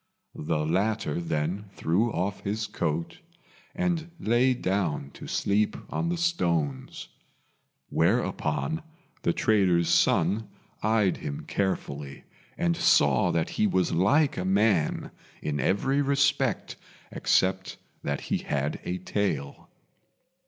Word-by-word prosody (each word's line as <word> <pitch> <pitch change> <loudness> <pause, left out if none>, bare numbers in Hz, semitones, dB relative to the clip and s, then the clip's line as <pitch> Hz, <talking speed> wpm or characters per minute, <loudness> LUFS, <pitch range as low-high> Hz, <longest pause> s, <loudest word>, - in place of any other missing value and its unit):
The 75 0 0
latter 100 +4 0
then 85 +5 -2
threw 105 +9 +1
off 95 +3 -2
his 105 +2 -2
coat, 85 -1 -3 0.6
and 175 -3 -1
lay 120 +3 +3
down 90 - -1
to - - -10
sleep 105 +1 +1
on 170 - -1
the 175 - -1
stones; 85 - -1 0.8
whereupon 155 - 0 0.4
the - - +2
trader's 90 -5 +2
son 90 +4 +2 0.3
eyed 110 -3 +2
him 70 - -6
carefully, 70 -8 -3 0.3
and 85 -1 +1
saw - - +4
that 80 -1 0
he 105 - +5
was 95 -2 +1
like 135 - +3
a 90 - -1
man 95 -3 +1 0.3
in 75 -1 -2
every 135 - +1
respect 140 -1 +1 0.3
except 95 0 +1 0.2
that - - -2
he - - -1
had 70 0 -2
a 90 - -2
tail. 95 -6 -3
95 Hz, 115 wpm, -27 LUFS, 80-110 Hz, 0.8 s, he